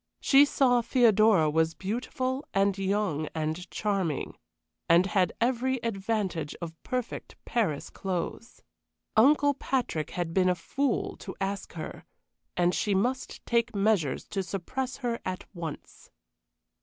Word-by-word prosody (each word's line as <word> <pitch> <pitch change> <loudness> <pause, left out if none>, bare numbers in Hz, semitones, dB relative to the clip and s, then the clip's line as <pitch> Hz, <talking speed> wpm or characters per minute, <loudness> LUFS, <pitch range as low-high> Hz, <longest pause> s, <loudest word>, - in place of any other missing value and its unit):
She 280 +1 +6
saw 250 -4 +3
Theodora 220 -8 +4
was 160 +1 +1
beautiful 255 +6 -2
and 195 0 +3
young 195 -6 0
and 160 +3 -3
charming, 195 -8 -1 0.5
and 170 +2 +6
had 190 -2 +2
every 255 +2 +1
advantage 195 -7 -2
of 165 -2 -5
perfect 250 -2 -4
Paris 205 -12 -1
clothes. 190 +5 -4 0.5
Uncle 285 +5 +5
Patrick 250 - -2
had 175 -2 -3
been 185 0 +3
a 180 - +2
fool 265 +9 -1
to 190 - -8
ask 195 0 -3
her, 160 -2 -7 0.5
and 175 0 +3
she 205 -2 +1
must 250 +7 -1
take 235 -2 +1
measures 195 -9 +1
to 195 - -1
suppress 205 +8 -4
her 235 -1 0
at 185 0 -4
once. 165 -4 -8
200 Hz, 130 wpm, -28 LUFS, 175-240 Hz, 0.5 s, She